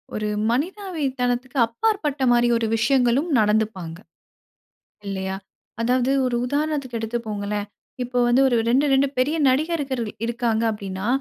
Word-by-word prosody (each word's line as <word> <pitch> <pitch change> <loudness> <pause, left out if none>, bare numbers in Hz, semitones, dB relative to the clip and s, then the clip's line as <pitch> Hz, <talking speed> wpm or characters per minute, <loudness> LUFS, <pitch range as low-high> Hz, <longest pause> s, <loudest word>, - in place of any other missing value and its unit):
ஒரு 215 0 -2 0.2
மனிதாவி 340 - -2 0.2
தனத்துக்கு 250 +2 -1
அப்பாற்பட்ட 295 - -1
மாரி 240 0 +4
ஒரு 230 - -1
விஷயங்களும் 260 +6 +2
நடந்துப்பாங்க. 210 -6 0 1.1
இல்லையா? 190 -1 -3 0.4
அதாவது 250 +2 +1 0.2
ஒரு 245 - 0
உதாரணத்துக்கு 285 -3 -2
எடுத்துப்கோங்களேன், 210 -3 -3 0.4
இப்போ 250 0 -2
வந்து 245 +3 +4
1 240 - +2
2- 275 +4 +3
2 270 +1 +4
பெரிய 290 +5 +2
நடிகர்கள் 270 -4 0 0.2
இருக்காங்க 235 -1 0
அப்படின்னா, 195 -1 -5
245 Hz, 120 wpm, -23 LUFS, 220-275 Hz, 1.1 s, மாரி